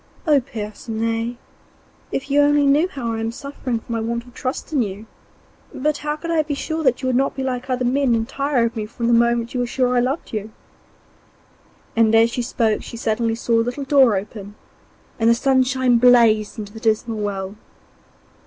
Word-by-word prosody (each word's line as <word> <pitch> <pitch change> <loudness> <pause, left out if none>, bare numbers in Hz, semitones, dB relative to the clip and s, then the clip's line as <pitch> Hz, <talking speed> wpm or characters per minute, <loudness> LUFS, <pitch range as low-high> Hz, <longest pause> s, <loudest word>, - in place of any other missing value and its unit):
'Oh, 300 -3 +5
Percinet! 225 0 -4 0.7
if 275 +1 -4
you 290 +1 +5
only 290 0 +4
knew 290 +5 +4
how 250 -10 -4
I 225 - -3
am 225 0 -2
suffering 265 -1 -4
for 225 - -10
my 230 - -1
want 235 +1 -2
of 245 - -16
trust 260 +5 -5
in 280 - +3
you! 205 0 -4 0.7
But 295 +2 -1
how 300 0 -2
could 335 +2 -5
I 325 -2 +3
be 295 -1 -3
sure 320 +3 -3
that 260 -1 +1
you - - 0
would 255 - +1
not 270 +2 +1
be 265 - -3
like 255 0 -3
other 255 -1 0
men 255 -1 +2
and 225 0 -1
tire 275 -2 0
of 230 +1 -3
me 215 -2 -3
from 235 +1 -5
the 235 - +3
moment 235 0 +2
you 250 - -2
were 245 - 0
sure 250 0 0
I - - +4
loved 260 +4 -2
you?' 215 0 -3 1.5
As 225 0 +4
she 245 - -2
spoke 230 -3 0
she 235 - -9
suddenly 225 0 0
saw 230 0 +1
a - - +4
little 245 +4 -3
door 265 -6 +5
open, 205 +1 -6 0.6
and 225 0 +3
the 235 - +5
sunshine 260 -1 +2
blazed 230 -4 +4
into 205 -1 -7
the 220 - -9
dismal 220 0 0
well. 200 -1 -3
240 Hz, 200 wpm, -21 LUFS, 225-270 Hz, 1.5 s, Oh